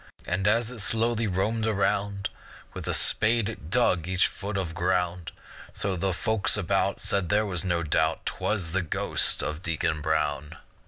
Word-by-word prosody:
And 95 +3 -1
as 115 +2 +1
it 125 - -9
slowly 115 +1 +1
roamed 105 +4 -1
around, 100 -1 0 0.5
With - - -7
a - - 0
spade 115 0 +4
it 85 -8 -9
dug 90 -8 +2
each 90 0 +2
foot 100 0 -4
of 90 -4 -3
ground; 90 -1 -1 0.4
So 95 -2 -2
the 95 +2 -1
folks 110 +3 +2
about 95 0 0
Said 100 -4 +1
there 105 +1 +2
was 90 -4 0
no 85 -3 0
doubt 80 - 0
Twas 95 -6 -2
the 95 +3 0
ghost 85 - 0
of 75 +2 -4
Deacon 80 -3 -1
Brown. 75 0 -1
95 Hz, 165 wpm, -26 LUFS, 85-105 Hz, 0.5 s, spade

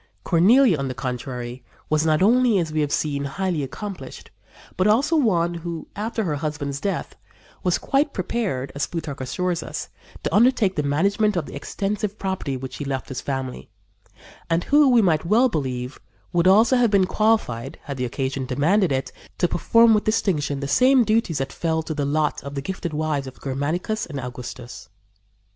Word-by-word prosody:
Cornelia, 195 - +5
on 135 - -2
the 130 - -4
contrary, 125 -1 -5 0.2
was 155 +1 +1
not 155 +3 +3
only, 240 0 +4
as 165 -4 -1
we 155 - +1
have 145 -1 -1
seen, 140 -2 -1
highly 175 +2 -2
accomplished, 180 +10 -7 0.4
but 185 - +2
also 275 +10 +3
one 175 - +2
who, 170 -1 -6
after 220 +2 -2
her 155 -6 -1
husband's 140 -2 -4
death, 200 +2 -3 0.5
was 180 -2 +1
quite 280 +2 +1
prepared, 185 - -2
as 140 -1 -2
Plutarch 155 -5 -5
assures 175 +7 -2
us, - - -6 0.3
to - - -2
undertake 225 -3 +4
the - - +1
management 200 +8 +1
of 165 - -1
the - - -9
extensive 205 +7 -3
property 190 -8 -3
which 130 0 -7
he - - -4
left 135 -1 -3
his 130 - -4
family, 130 - -4 0.8
and 165 +1 +1
who, 290 -1 +5
we 240 -3 +5
may 165 -5 +3
well 230 +9 +4
believe, 130 - -3 0.3
would 175 +1 +3
also 225 +7 +5
have 240 -2 +4
been 200 -2 +4
qualified, 215 - 0
had 140 -2 -6
the 125 - -1
occasion 130 +1 -3
demanded 160 +8 +2
it, 135 -1 -1 0.3
to 175 - +2
perform 230 +6 +4
with 210 - +2
distinction 155 -10 0
the 140 - -3
same 255 - +5
duties 215 -8 +1
that 135 0 -3
fell 160 -1 -1
to 155 - -4
the 145 -2 -2
lot 150 +1 0
of 140 0 -7
the 140 - -2
gifted 190 -1 -4
wives 150 -3 -1
of 130 - -11
Germanicus 155 +10 -2
and 145 -4 -5
Augustus. 125 -1 -8
165 Hz, 180 wpm, -23 LUFS, 140-210 Hz, 0.8 s, Cornelia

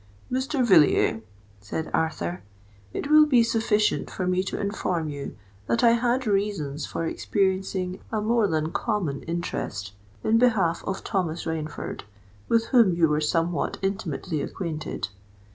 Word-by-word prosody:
"Mr. 260 +1 0
Villiers," 155 - +4 0.4
said 105 +11 -5
Arthur, 90 - -1 0.5
"it 285 - -4
will 305 0 +8
be 250 -5 +5
sufficient 220 -2 +1
for 185 - -3
me 180 0 +2
to 195 - -4
inform 180 -5 -1
you 145 -1 -6 0.3
that 115 - +1
I 235 - +7
had 245 +2 +1
reasons 195 -9 -1
for 165 - -3
experiencing 190 0 -1
a 220 - 0
more 220 0 +2
than 160 -2 -1
common 195 - -1
interest 105 - -4 0.3
in 225 +1 +3
behalf 200 -9 +2
of 190 - -3
Thomas 175 -5 -2
Rainford, 160 -2 -4 0.5
with 230 0 +3
whom 230 -9 +5
you 170 -1 +4
were 150 0 +1
somewhat 165 +1 0
intimately 180 -4 -2
acquainted. 155 - -4
185 Hz, 140 wpm, -25 LUFS, 155-220 Hz, 0.5 s, will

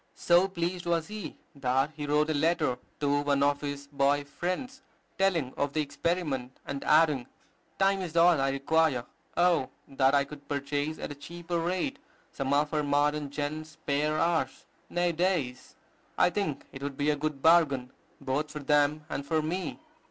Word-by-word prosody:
So 175 +2 +4
pleased 175 -1 -3
was 165 0 0
he 215 -1 -6 0.2
that 135 +1 +1
he 150 -1 -5
wrote 150 +2 +2
a - - +1
letter 150 -4 +1 0.2
to 145 0 +2
one 140 -1 +2
of 145 0 +2
his 145 -1 -4
boy 140 0 +1
friends, 185 - -4 0.4
telling 170 -9 +1
of 140 0 -1
the 155 - +1
experiment, 145 -4 -2
and 140 -1 -4
adding, 150 -5 +4 0.5
"Time 195 0 +3
is 170 -2 -4
all 170 -3 +6
I 135 - +2
require. 140 -1 +1 0.3
Oh, 175 -6 +3 0.2
that 135 0 +3
I 140 - +4
could 145 0 -11
purchase 145 +2 -2
at - - -5
a - - -3
cheap 170 +4 -11
rate 180 - -1 0.3
some 135 -1 -3
of 150 +2 +2
our 150 - +2
modern 145 0 +1
gent's 150 +2 -4
spare 150 0 -1
hours, 160 -5 0 0.2
nay, 175 0 +1
days! 165 -7 -1 0.4
I - - +4
think 195 -9 -2
it 135 - -9
would 140 -1 -4
be 145 +1 +2
a - - +1
good 145 -1 -3
bargain, 145 -7 +4 0.3
both 145 +3 -1
for - - -7
them 150 +1 +2
and 140 - -4
for 155 +2 0
me." 180 +4 -3
150 Hz, 175 wpm, -29 LUFS, 140-170 Hz, 0.5 s, all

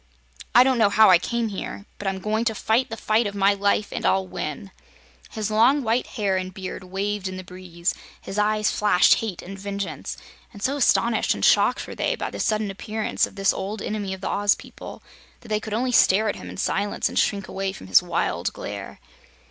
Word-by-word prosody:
I 245 - +9
don't 260 -2 +2
know 215 -3 +5
how 215 -1 +6
I 175 - +7
came 235 +4 -2
here, 200 0 -6
but 205 - -4
I'm 190 0 -1
going 215 +4 -1
to 225 -2 0
fight 235 +5 +1
the 225 - -5
fight 220 +1 +1
of 200 - -6
my 200 0 +4
life 200 +1 +1
and - - -4
I'll 190 0 +2
win!" 150 - -6 0.6
His 215 -1 -3
long 250 +7 +4
white 235 +2 0
hair 200 -3 +1
and 185 0 -4
beard 185 0 -7
waved 195 +1 -3
in 185 0 -5
the 185 - -7
breeze; 180 -1 -4 0.3
his 195 - -5
eyes 215 0 +2
flashed 205 -4 +4
hate 215 -6 -5
and 195 +2 -9
vengeance, 200 0 -5 0.3
and 205 -3 -11
so 275 - +1
astonished 235 -4 +2
and - - 0
shocked - - +3
were - - -8
they - - -1
by - - -4
the - - -7
sudden 215 -2 0
appearance 215 +2 -1
of - - -16
this 195 -1 +2
old 205 +3 -4
enemy 205 -1 -3
of 190 - -15
the - - -3
Oz 205 0 +2
people - - -11 0.4
that 235 - -14
they 215 -1 +1
could 215 0 -5
only 250 +2 0
stare 215 -2 +4
at 205 - -1
him - - -9
in - - -9
silence 205 +1 0
and - - -1
shrink 200 -2 0
away 195 0 -3
from 190 - -11
his 95 -1 +5
wild - - -1
glare. - - -7
205 Hz, 220 wpm, -24 LUFS, 190-220 Hz, 0.6 s, I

